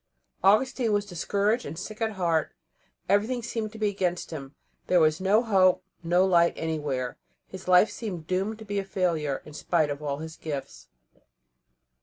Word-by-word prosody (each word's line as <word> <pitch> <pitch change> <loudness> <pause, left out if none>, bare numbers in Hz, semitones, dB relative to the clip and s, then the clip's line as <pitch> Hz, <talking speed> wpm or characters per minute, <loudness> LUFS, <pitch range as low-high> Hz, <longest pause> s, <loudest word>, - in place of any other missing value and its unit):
Augustine 230 +4 +3
was 205 0 +1
discouraged 205 +5 0
and 155 +3 -7
sick 215 +4 -7
at 220 -1 0
heart; 170 -5 0 0.5
everything 220 +5 +1
seemed 220 -2 -3
to 220 - -10
be 215 -1 +1
against 180 -4 -2
him; 140 -3 -7 0.3
there 180 - +4
was 155 +2 +3
no 205 +5 +4
hope, 190 -5 +4 0.2
no 175 +2 +3
light 170 -2 +4
anywhere. 145 -6 -3 0.3
His 190 -1 -10
life 185 +3 +6
seemed 185 -8 -6
doomed 190 +5 -1
to 220 - -11
be 205 -1 -2
a - - -2
failure, 170 -7 -1
in 150 - -11
spite 155 0 +1
of 145 +1 -5
all 140 -2 -2
his 160 +1 -8
gifts. 135 - -6
185 Hz, 170 wpm, -27 LUFS, 160-205 Hz, 0.5 s, life